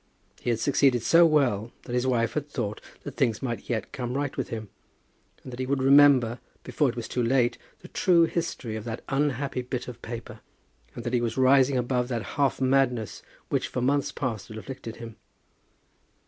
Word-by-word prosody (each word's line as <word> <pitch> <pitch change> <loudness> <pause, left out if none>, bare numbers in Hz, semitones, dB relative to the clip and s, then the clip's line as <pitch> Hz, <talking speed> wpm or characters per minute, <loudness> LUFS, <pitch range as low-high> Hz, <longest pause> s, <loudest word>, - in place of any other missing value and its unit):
He - - -3
had 115 -1 +1
succeeded 135 -2 +3
so 170 +6 +6
well 120 -8 +1
that 120 - -7
his 125 +1 +1
wife 115 -2 +1
had 150 -1 -3
thought 110 -7 -4 0.2
that - - -6
things 115 0 +1
might 120 -3 -4
yet 115 -3 -2
come 125 -1 -4
right 145 -1 -2
with - - -3
him, 110 -3 -6 0.8
that 125 -1 -8
he 130 - -2
would 135 -1 0
remember, 135 -4 +6 0.2
before 145 -3 +1
it 120 - -5
was 120 -1 -5
too 125 - -2
late, 120 0 +2 0.2
the - - -11
true 170 -2 +3
history 165 -9 -2
of 110 - -5
that 115 0 -5
unhappy 140 -2 0
bit 125 0 -5
of 120 -1 -9
paper, 115 0 -7 0.6
and 120 - -6
that 120 +1 -3
he 120 - +2
was 115 0 -2
rising 130 0 +5
above 125 0 0
that 120 -3 -2
half 140 -2 +1
madness 130 -5 +1 0.3
which - - 0
for - - -4
months 140 +2 +1
past 115 -7 -4
had 110 - -9
afflicted 115 -1 -7
him. 115 -2 -10
125 Hz, 190 wpm, -26 LUFS, 115-135 Hz, 0.8 s, so